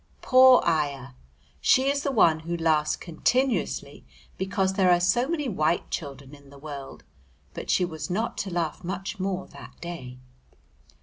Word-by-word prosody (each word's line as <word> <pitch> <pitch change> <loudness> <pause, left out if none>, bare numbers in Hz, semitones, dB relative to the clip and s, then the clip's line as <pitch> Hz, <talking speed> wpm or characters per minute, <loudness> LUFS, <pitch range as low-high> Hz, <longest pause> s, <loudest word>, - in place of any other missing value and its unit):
Poor 255 -1 +7
ayah! 140 -5 -1 0.5
she 260 +1 +3
is 280 0 +1
the 280 - -1
one 170 -10 +4
who 170 +2 -4
laughs 155 -2 +1
continuously 230 +6 -1 0.3
because 190 0 -1
there 190 -1 +3
are 175 -1 +5
so 185 +9 +2
many 305 -3 -2
white 170 -6 0
children 140 -2 -6
in 140 -1 -15
the 140 - -14
world, 140 -2 -9 0.5
but - - -8
she 180 - +3
was 160 -3 -6
not 215 +6 -2
to 195 - -3
laugh 170 -1 -3
much 190 +3 -5
more 185 -1 -2
that - - -14
day. 165 -8 -8
175 Hz, 160 wpm, -26 LUFS, 155-195 Hz, 0.5 s, Poor